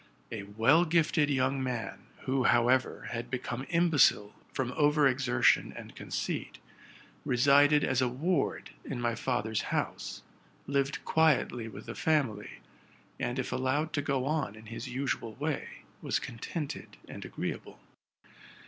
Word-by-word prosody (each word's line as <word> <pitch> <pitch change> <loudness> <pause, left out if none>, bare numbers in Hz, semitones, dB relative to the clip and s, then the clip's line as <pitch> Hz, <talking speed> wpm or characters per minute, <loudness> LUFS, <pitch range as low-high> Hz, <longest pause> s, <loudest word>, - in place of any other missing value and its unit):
A 110 - -4
well 115 +11 +3
gifted 160 -2 +2
young 135 0 +1
man, 125 -3 -4
Who! 130 -1 0
however, 120 +3 +2
had 120 0 -4
become 125 +1 -4
imbecile 165 -11 +4 0.2
from 125 -2 -2
over 150 +1 +4
exertion 130 -1 +3
and - - -10
conceit, - - -4 0.7
resided 145 +4 +5
as 130 -1 +1
a 130 - +3
ward 145 +6 -1
in 130 - -5
my 120 -1 0
father's 110 -3 -1
house, - - -3 0.4
lived 140 0 -1
quietly 145 -7 +2
with 110 - -9
the - - -6
family, 130 -10 -1 0.6
and, 120 - -2
if 130 - -2
allowed 140 +5 0
to 145 - +1
go 140 -3 -1
on 150 -7 -1
in 110 +1 -13
his 120 - -6
usual 125 -3 -3
way, 150 +2 -4 0.2
was - - 0
contented 140 +6 -6
and - - -8
agreeable. - - -5
130 Hz, 135 wpm, -30 LUFS, 120-145 Hz, 0.7 s, resided